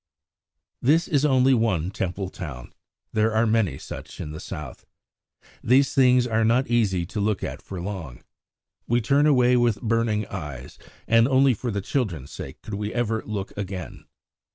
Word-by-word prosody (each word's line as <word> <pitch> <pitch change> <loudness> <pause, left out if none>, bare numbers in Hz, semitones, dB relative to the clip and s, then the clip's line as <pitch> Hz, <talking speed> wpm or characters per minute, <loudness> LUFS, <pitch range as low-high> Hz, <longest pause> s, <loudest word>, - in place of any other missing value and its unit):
This 160 +7 +3
is 145 -5 +1
only 130 -2 +4
one 100 -8 +1
Temple 95 0 -3
town. 70 -10 -8 0.4
There 110 0 +1
are 110 +1 +3
many 110 -10 +1
such - - -9
in 75 - -5
the 80 - -7
South. 75 -4 -8 0.8
These 135 +3 +4
things 125 -2 +5
are 115 -2 +1
not 120 +4 +3
easy 105 -7 +1
to 105 - -5
look 105 -2 0
at - - -5
for 95 - -7
long. 85 -9 -6 0.6
We 120 +1 +2
turn 140 +6 +3
away 125 -3 +4
with 120 -4 +2
burning 115 -2 +1
eyes, 75 -10 -8 0.3
and 115 +1 +5
only 135 0 +4
for 120 +3 -4
the 100 -2 -2
children's 90 - -2
sake - - -9
could 110 - -8
we 105 +1 -3
ever 115 -2 -1
look 100 -2 -4
again. 95 -3 -6
110 Hz, 165 wpm, -24 LUFS, 95-125 Hz, 0.8 s, things